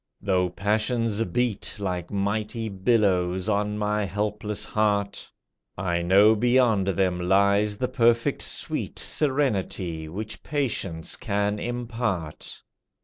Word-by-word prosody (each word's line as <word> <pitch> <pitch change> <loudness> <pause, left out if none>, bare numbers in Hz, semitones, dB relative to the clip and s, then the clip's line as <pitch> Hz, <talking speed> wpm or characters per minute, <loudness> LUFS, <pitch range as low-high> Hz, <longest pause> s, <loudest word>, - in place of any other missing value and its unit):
Though 95 -2 +1
passions 110 +3 0
beat 115 +3 -1
Like 90 -4 -3
mighty 105 +3 -2
billows 95 -3 +1
on 105 0 0
my 105 0 0
helpless 105 +1 -2
heart, 105 -2 0 0.5
I 85 -2 0
know 100 +5 +6
beyond 120 -3 +3
them 90 -1 +1
lies 100 +3 +3
the 125 - 0
perfect 115 -2 +2
sweet - - -3
Serenity, 100 - -1
which 105 +6 -6
patience 110 - -2
can 105 +1 -1
impart. 115 -9 -3
105 Hz, 105 wpm, -25 LUFS, 95-115 Hz, 0.5 s, know